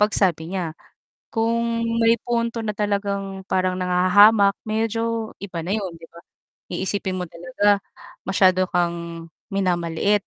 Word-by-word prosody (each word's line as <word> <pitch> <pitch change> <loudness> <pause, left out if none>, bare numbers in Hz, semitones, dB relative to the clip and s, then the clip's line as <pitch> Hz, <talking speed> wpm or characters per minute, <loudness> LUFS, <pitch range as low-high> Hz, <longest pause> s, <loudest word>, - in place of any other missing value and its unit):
pagsabi 190 -4 +1
niya. 170 -4 -2 0.6
Kung 230 0 0 0.2
may 230 0 +5
punto 235 -1 -1
na 210 - -1
talagang 200 -2 -2
parang 185 0 0
nanghahamak, 200 +3 +5
medyo 225 +1 -1
iba 180 -5 -6
na 180 - -5
'yon, 195 -5 -2
'di 165 0 -13
ba? 170 - -15 0.6
Iisipin 190 +1 -2
mo 180 -1 -2
talaga 175 +4 +1 0.5
masyado 185 -1 +3
kang 170 -1 -2 0.3
minamaliit 180 +1 +1
195 Hz, 125 wpm, -22 LUFS, 180-215 Hz, 0.6 s, may